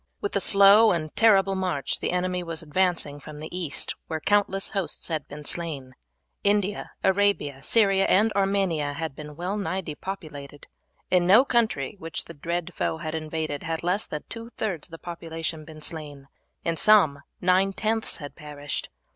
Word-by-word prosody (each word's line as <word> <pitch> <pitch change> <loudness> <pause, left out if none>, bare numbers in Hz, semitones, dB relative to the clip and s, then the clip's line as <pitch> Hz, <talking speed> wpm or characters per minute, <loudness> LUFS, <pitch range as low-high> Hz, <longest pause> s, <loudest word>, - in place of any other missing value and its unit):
With 205 - -3
a - - +3
slow 200 +3 +7
and 155 -3 -2
terrible 195 -4 +5
march 180 -7 -1
the - - -2
enemy 180 0 -1
was 165 -1 -5
advancing 160 -2 0
from 150 +1 -10
the 155 +3 -7
East, 170 -6 0
where 160 - -3
countless 195 +1 +1
hosts 195 -4 -3
had 155 -3 -3
been 150 0 -9
slain. 145 -7 -3 0.5
India, 205 0 +1
Arabia, 190 -8 +2
Syria, 195 +2 +3
and 215 +3 +4
Armenia 195 -7 +1
had 160 -1 -4
been 150 0 -9
well 180 +5 -3
nigh 190 -2 -2
depopulated. 150 -4 -7 0.5
In 180 -1 +4
no 220 +8 +7
country 220 - 0
which 165 0 -4
the 170 - -10
dread 170 +3 -3
foe 160 - -1
had 155 -1 -5
invaded 155 -2 -3
had 165 0 -3
less 185 +4 +1
than 150 - -5
two 230 0 -7
thirds 185 -8 -2
of - - -28
the 165 - -8
population 165 -2 -4
been 155 -1 -11
slain; 145 -4 -6 0.4
in 165 -1 0
some 160 -10 +5 0.2
nine 185 +2 +3
tenths 220 +2 -1
had 145 -2 -9
perished. 145 -2 -5
170 Hz, 170 wpm, -26 LUFS, 150-195 Hz, 0.5 s, slow